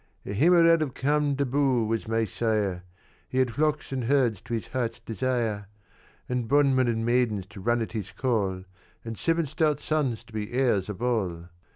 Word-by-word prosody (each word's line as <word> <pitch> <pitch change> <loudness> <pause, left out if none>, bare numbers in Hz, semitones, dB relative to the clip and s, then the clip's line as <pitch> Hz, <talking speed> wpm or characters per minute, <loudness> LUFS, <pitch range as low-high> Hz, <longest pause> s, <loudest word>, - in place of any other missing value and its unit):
"A 100 - -4
Heemraad 165 - +5
of 140 -5 -2
Camdebóo 140 -3 +1
was 115 0 -2
my 115 0 +1
sire; 105 -3 -1 0.5
He 130 - -4
had 130 -2 +2
flocks 150 0 0
and 130 -3 -2
herds 120 -6 +2
to 120 - -4
his 110 - -4
heart's 120 -3 -2
desire, 115 -3 -2 0.6
And 125 -2 -2
bondmen 135 -1 +3
and 115 -1 0
maidens 120 -5 +1
to 100 -2 -10
run 120 +3 +1
at - - -7
his 105 -4 -5
call, 100 -7 -1 0.4
And 115 0 -5
seven 165 +6 0
stout 150 0 0
sons 135 -8 -1
to 115 -1 -19
be 110 +1 -4
heirs 120 -7 +1
of 105 +2 -5
all. 90 -9 -1
120 Hz, 175 wpm, -27 LUFS, 110-140 Hz, 0.6 s, Heemraad